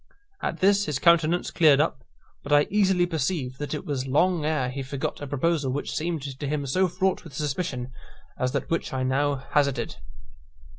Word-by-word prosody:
At - - -3
this 200 +1 +4
his 150 -3 -1
countenance 170 +2 +3
cleared 150 -4 +5
up: 150 -3 0 0.4
but 145 - -8
I 145 0 +6
easily 190 -3 +3
perceived 150 -5 -2
that 145 +1 -3
it 150 - -6
was 135 -3 -2
long 165 +5 +2
ere 145 -5 0
he 135 +1 -4
forgot 135 +1 -4
a 145 - -5
proposal 145 0 0
which 145 +2 -3
seemed 160 -1 -2
to 140 +1 -5
him 145 0 -1
so 185 +8 +2
fraught 185 +2 -1
with 155 -6 -12
suspicion 140 -4 -3 0.4
as 125 0 -1
that 140 - -3
which 165 - -1
I - - -1
had 130 - 0
now 145 +2 +1 0.2
hazarded. 140 -2 +1
145 Hz, 190 wpm, -26 LUFS, 135-170 Hz, 0.4 s, I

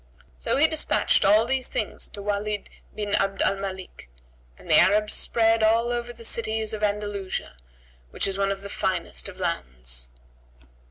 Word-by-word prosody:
So - - -1
he 290 - +6
despatched 315 -1 +2
all 210 +3 +5
these 260 +1 0
things - - -2
to 200 - -9
Walid 205 0 -2 0.2
bin 205 -1 -3
Abd 195 0 +1
al 195 - +2
Malik, 190 - -7 0.5
and - - -16
the - - +6
Arabs 210 +2 +4
spread 225 -1 +2
all 230 +2 +3
over 240 0 -3
the 230 -1 -11
cities 220 -1 -1
of 215 - -4
Andalusia 205 - -2 0.5
which - - -1
is 195 - -1
one 195 0 +1
of 195 0 -4
the 200 - -7
finest 190 +1 -1
of 185 -1 -12
lands. 65 - -2
205 Hz, 165 wpm, -25 LUFS, 195-225 Hz, 0.5 s, he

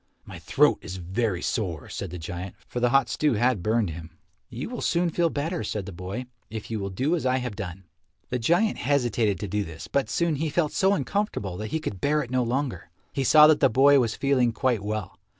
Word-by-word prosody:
"My - - -9
throat - - +3
is 95 - -7
very 95 +2 -2
sore," 90 - -2
said 100 - -5
the 90 - -6
giant, 90 +3 -6
for 125 - -4
the 120 0 +3
hot 135 -1 +4
stew 150 +2 +1
had 120 -2 +2
burned 110 -1 +1
him. 80 +1 -8 0.4
"You 125 +1 -5
will 245 0 -6
soon 170 0 +1
feel 170 +1 +2
better," 160 +2 -2
said 105 -1 -3
the 100 - -7
boy, 95 +8 -5 0.2
"if 110 0 -7
you 110 - -2
will 100 0 -3
do 130 - 0
as 165 - -3
I 130 0 +2
have 125 -5 -4
done." 95 -1 -6 0.5
The 125 - -1
giant 175 - +2
hesitated 120 -7 +1
to 105 - -3
do 105 +2 -1
this, 80 -3 -9
but 135 -6 0
soon 165 +4 +1
he 155 +2 -1
felt 155 0 0
so 190 +1 +3
uncomfortable 170 - -2
that 110 - -4
he 160 - -1
could 100 - -5
bear 150 +1 +2
it 125 - -10
no 130 0 +2
longer. 125 - -2 0.2
He 135 - -1
saw 150 +4 +8
that 155 -1 +5
the - - +5
boy 135 +4 +6
was 115 -3 0
feeling 130 -4 +2
quite 120 -3 +1
well. 105 -2 -4
120 Hz, 230 wpm, -26 LUFS, 100-145 Hz, 0.5 s, saw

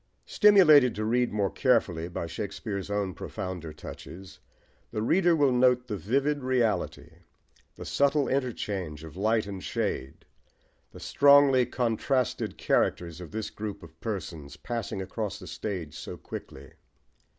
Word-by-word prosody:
Stimulated 155 - +6
to 110 +1 -2
read 120 +2 +1
more 100 -2 0
carefully 100 -11 +1
by 85 -1 -4
Shakespeare's 100 +2 -5
own 100 -2 -1
profounder 90 -2 -6
touches, 90 +4 -10 0.5
the 105 - -3
reader 175 +6 +3
will 145 -4 +3
note 125 0 +3
the 110 -4 -4
vivid 140 - 0
reality, 110 - -1 0.6
the - - -9
subtle 140 0 +2
interchange 100 - -3
of 80 -1 -10
light 110 +3 +1
and 100 -2 -7
shade, 65 - -3 0.6
the - - -13
strongly 140 -3 +5
contrasted 125 +1 -1
characters 85 0 0
of 85 - -8
this 110 +1 -5
group 105 -3 -6
of 80 0 -15
persons, 80 -9 -5
passing 115 -5 -4
across 100 +1 -4
the - - -11
stage 90 -8 -5
so - - -7
quickly. - - -9
110 Hz, 135 wpm, -28 LUFS, 90-125 Hz, 0.6 s, Stimulated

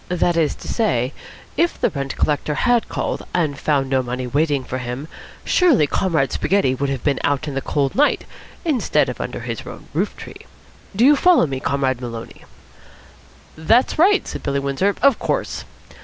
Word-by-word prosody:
That 175 -1 +1
is 160 -3 +1
to - - -11
say, 135 - 0 0.4
if 340 0 +1
the - - +1
rent 140 -2 -4
collector 150 0 0
had 240 +4 +2
called - - -3
and 155 -5 +1
found 140 -1 0
no 130 0 +1
money 125 +1 -4
waiting 145 +1 0
for 130 +1 -4
him, 125 +4 -5 0.4
surely 320 - +4
Comrade 155 -3 0
Spaghetti 195 -10 +1
would 140 +2 -2
have 135 -3 -3
been 140 -3 +1
out 145 +1 0
in 145 - -4
the 135 - -2
cold 140 0 -1
night 295 +2 +2 0.4
instead 290 -8 +1
of - - -5
under - - -5
his - - -4
own - - -10
roof - - -1
tree. - - -11 0.5
Do 230 +5 +4
you 295 +2 +7
follow 355 - +5
me, 135 -3 -4
Comrade 130 -2 -1
Maloney?" 115 -2 -8 1.1
"That's 225 - +2
right," 390 +4 +4
said - - -6
Billy 140 0 -1
Windsor. 140 +9 0
"Of 275 -4 +5
course." - - -2
145 Hz, 180 wpm, -20 LUFS, 135-205 Hz, 1.1 s, you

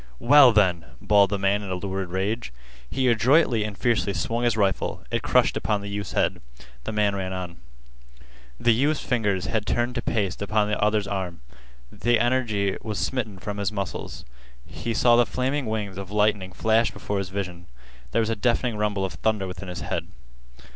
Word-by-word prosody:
"Well, 135 - +7
then!" 90 -7 +2
bawled 100 +3 +4
the 100 - -1
man 100 +1 +1
in 100 - -7
a 95 - -1
lurid 95 0 -4
rage. 100 - -2 0.4
He 130 -1 0
adroitly 120 0 +3
and 105 -2 -5
fiercely 115 -4 +1
swung 115 +3 -1
his 115 -2 +1
rifle. 100 -3 0
It - - 0
crushed - - +3
upon 105 -2 -1
the 100 - -6
youth's 100 -1 -5
head. - - 0 0.4
The - - -3
man 105 -2 +1
ran 95 -1 -3
on. 90 -2 -6 1.0
The 120 - +4
youth's 140 +6 +1
fingers 105 -7 0
had 110 -2 -2
turned 120 +1 0
to 120 - -2
paste 100 -6 -1
upon 105 +1 +1
the 105 - -1
other's 105 -1 +2
arm. 95 -5 -4 0.5
The 120 0 +1
energy 115 -6 +1
was 110 -2 -4
smitten 110 0 -2
from 100 +3 -5
his 100 0 -1
muscles. 100 -4 -5 0.4
He 115 0 -5
saw 120 +1 +5
the 120 0 +5
flaming 130 +1 -1
wings 105 -3 -3
of 95 -2 -7
lightning 105 -2 +1
flash 110 +5 +2
before 100 -1 -4
his 95 -2 -4
vision. 90 -3 -5 0.4
There - - +2
was 110 - -1
a - - 0
deafening 120 -1 0
rumble 105 -2 0
of 95 - -5
thunder 105 +4 0
within 90 0 -7
his 90 - -6
head. - - -3
105 Hz, 190 wpm, -25 LUFS, 95-115 Hz, 1.0 s, Well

